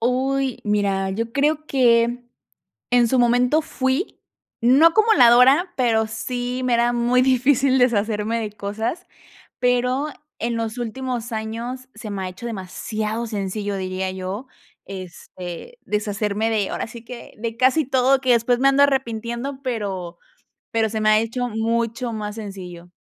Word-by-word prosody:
Uy, 260 +2 0
mira, 200 -2 0
yo 230 +4 -3
creo 300 +2 +1
que 240 -2 +3 0.7
en 245 -1 +4
su 260 +2 +2
momento 245 +5 +3
fui, 270 - -2 0.4
no 265 +7 +6
acumuladora, 320 - +5
pero 225 -3 +2
sí, 245 +3 -4
me 250 - +1
era 235 +1 +2
muy 240 +1 +2
difícil 260 +1 +3
deshacerme 225 -2 +1
de 215 -2 -4
cosas, 210 - -4 0.5
pero, 250 +3 +1 0.3
en 235 0 -1
los 225 +1 -3
últimos 245 0 -4
años 230 +4 -5
se 215 - -7
me 200 -2 -4
ha 185 - -3
hecho 185 +6 -9
demasiado 215 +2 -4
sencillo 205 -1 -3
diría 185 0 -3
yo, 190 +6 -5 0.4
este, 185 - -9
deshacerme 210 +1 -1
de 210 -3 0
ahora - - -3
sí 230 +1 -11
que, 235 0 -10
de 225 0 -4
casi 260 +5 +3
todo 265 0 +3
que 260 -2 +3
después 235 +1 +2
me 270 - +5
ando 275 +1 +4
arrepintiendo, 255 0 -2
pero 195 -8 -4 0.5
pero 225 -1 +1
se 220 0 -3
me 215 - +3
ha 215 0 +5
hecho 245 +2 -2
mucho 230 +2 -1
más 210 -1 -4
sencillo. 185 -5 -8
235 Hz, 145 wpm, -22 LUFS, 215-255 Hz, 0.7 s, no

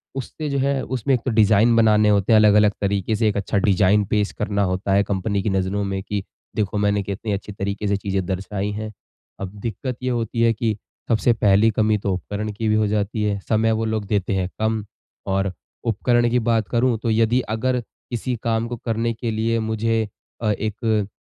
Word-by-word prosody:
उससे 145 +3 -5
जो 140 - -1
है 135 0 +1
उसमें 130 +1 -1
एक 125 - +1
तो 130 - +1
डिज़ाइन 110 +1 +4
बनाने 105 -2 +4
होते 100 0 +2
हैं, - - +7
अलग-अलग 105 -1 +5
तरीके 100 +1 0
से 110 +1 +1
एक 105 - -2
अच्छा 100 0 -1
डिज़ाइन 100 +1 +3
पेश 105 0 0
करना 100 -1 -1
होता 95 +2 -1
है 100 +1 +4
कंपनी 100 0 -1
की 105 - 0
नज़रों 95 +1 0
में 95 -1 -2
कि 100 -1 -3 0.3
देखो 105 -1 -1
मैंने 100 0 +1
कितनी 100 +2 -4
अच्छी 100 +1 -5
तरीके 100 +1 -3
से 100 0 +1
चीज़ें 95 -1 -2
दर्शाई 100 +2 -3
हैं। 110 +1 -5 0.5
अब 95 -1 -5
दिक्कत 120 +4 -4
ये 130 - 0
होती 115 -1 -1
है 115 0 +4
कि 110 -1 -1 0.3
सबसे 115 +1 +3
पहली 105 0 +4
कमी 110 0 +2
तो 100 -1 -1
उपकरण 105 +4 -4
की 110 +2 -3
भी 110 - +3
हो 110 -1 +2
जाती 105 +1 -1
है, 100 -1 0
समय 110 +3 +1
वो 110 0 0
लोग 110 -2 -2
देते 100 -1 0
हैं 95 -1 -1
कम 110 0 0 0.4
और 95 -1 0 0.3
उपकरण 120 +1 +2
की 125 +1 +2
बात 115 -2 +1
करूँ 120 -1 +2
तो 115 - 0
यदि 115 +3 +3
अगर 125 +2 0 0.3
किसी 125 +1 -2
काम 115 0 0
को 120 0 -5
करने 115 0 -1
के 115 0 -3
लिए 115 +1 0
मुझे 110 0 0 0.4
अ, 110 -2 +1
एक 110 0 -1
105 Hz, 205 wpm, -22 LUFS, 100-115 Hz, 0.5 s, हैं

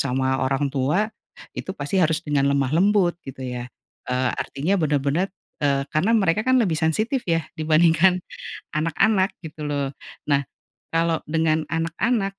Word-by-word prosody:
sama 130 0 0
orang 135 +1 0
tua, 175 +11 +1 0.4
itu 190 - -6
pasti 145 +7 0
harus 165 0 +1
dengan 140 -2 +1
lemah 140 -1 +1
lembut 180 -1 +3
gitu 130 -1 -8
ya, 125 0 -5 0.4
eee, 125 0 +1
artinya 170 +8 -1
benar-benar, 150 +4 +1 0.3
eee, 140 -1 +1
karena 200 +10 +3
mereka 190 -1 +2
kan 255 +3 +3
lebih 210 -9 +2
sensitif 215 - +1
ya 165 -2 +1
dibandingkan 165 +3 +4 0.6
anak-anak 190 +5 +2
gitu 155 -2 -8
loh 145 -2 -1 0.4
nah, 140 -1 +2 0.5
kalau 165 0 +2
dengan 160 0 +1
anak-anak 195 +5 -1
160 Hz, 140 wpm, -23 LUFS, 140-185 Hz, 0.6 s, dibandingkan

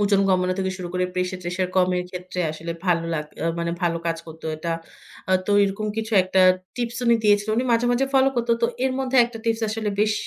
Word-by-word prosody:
ওজন 200 -1 +3
কমানো 185 -1 +2
থেকে 190 0 0
শুরু 180 -2 -6
করে, 180 0 0
প্রেশার-ট্রেশার 180 0 -2
কমের 180 -1 +2
ক্ষেত্রে 180 0 -5
আসলে 165 +2 -5
ভালো 170 -2 +2
লাগ 150 -1 -2 0.2
আ - - +1
মানে, 170 0 -1
ভালো 170 -1 +1
কাজ 165 0 0
করতো 160 0 -12
এটা। 165 +2 -3 0.6
আ - - +4
তো - - -1
এরকম 200 +2 -2
কিছু 225 0 -3
একটা 185 +1 +1 0.4
টিপস 240 -1 -3
উনি 235 -1 +5
দিয়েছিল। 205 0 +3
উনি 245 - +1
মাঝে, 230 +1 +2
মাঝে 260 +3 +1
ফলো 270 0 +5
করত। 240 0 -1
তো - - +5 0.2
এর 265 - +1
মধ্যে 265 0 0
একটা 235 -1 -7
টিপস 225 0 0
আসলে, 215 0 -2
বেশ 215 0 +3
190 Hz, 215 wpm, -23 LUFS, 180-225 Hz, 0.6 s, উনি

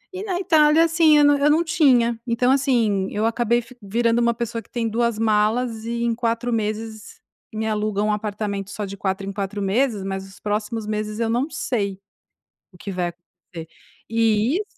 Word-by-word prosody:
e 380 - -4
na 375 -4 -2
Itália 315 -3 +4
assim 330 -2 +4
eu 295 - +5
nã 290 0 +4
eu 290 +1 +3
não 315 +3 +3
tinha, 250 -8 +3
então, 245 +2 +2
assim, 235 -8 +2
eu 215 +1 -1
acabei 235 +1 +1
fi 245 +2 -16
virando 230 +3 +1
uma 235 0 +2
pessoa 230 0 -4
que - - -25
tem 235 -2 -2
2 235 0 0
malas 220 +1 +1
e 235 0 -2
em 235 -1 +1
4 235 +1 -1
meses 220 - -4 0.3
me 220 0 -3
aluga 210 -1 -1
um 210 - +1
apartamento 205 -2 -3
só 205 0 -4
de 200 0 -7
4 195 0 -3
em 195 - -4
4 200 +1 -4
meses, 215 +1 0
mas 195 0 -4
os 195 +1 -16
próximos 210 +1 -3
meses 215 0 -3
eu 230 - 0
não 250 +6 0
sei 200 -10 -2 0.7
o 180 - -18
que 200 - -7
vai 180 -2 -1
acontecer 170 -1 -12 0.4
e 225 +2 +2
isso 415 - -1
225 Hz, 195 wpm, -22 LUFS, 210-245 Hz, 0.7 s, eu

